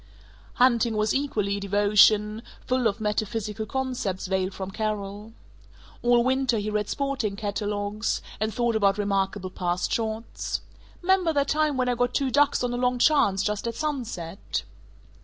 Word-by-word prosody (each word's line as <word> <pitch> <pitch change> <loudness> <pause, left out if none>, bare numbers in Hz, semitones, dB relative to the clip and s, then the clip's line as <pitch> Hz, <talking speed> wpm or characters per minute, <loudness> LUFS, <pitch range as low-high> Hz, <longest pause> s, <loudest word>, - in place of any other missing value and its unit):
Hunting 235 -3 +3
was 215 0 +1
equally 210 -8 0
a - - -4
devotion, 205 +2 +4 0.2
full 255 -2 +2
of 205 +1 -2
metaphysical 215 0 -2
concepts 250 -7 -2
veiled 190 0 0
from 190 0 -6
Carol. 210 0 -4 0.7
All 240 0 +4
winter 260 -2 +1
he 210 0 -2
read 210 -1 -1
sporting 275 -8 -1
catalogues, 205 +1 -2 0.2
and 215 +1 0
thought 235 0 0
about 200 -2 +3
remarkable 195 -2 -1
past 180 -1 -1
shots: 225 0 -3 0.4
"'Member 370 -2 +3
that 280 -1 +1
time 305 -2 +1
when 255 -1 +1
I 250 - +2
got 245 +1 0
two 270 -2 +1
ducks 290 0 +3
on 245 -1 -1
a - - -2
long 250 0 +1
chance, 245 -8 +3
just 210 +1 -2
at 230 - -3
sunset?" 230 - -3
215 Hz, 155 wpm, -26 LUFS, 200-250 Hz, 0.7 s, devotion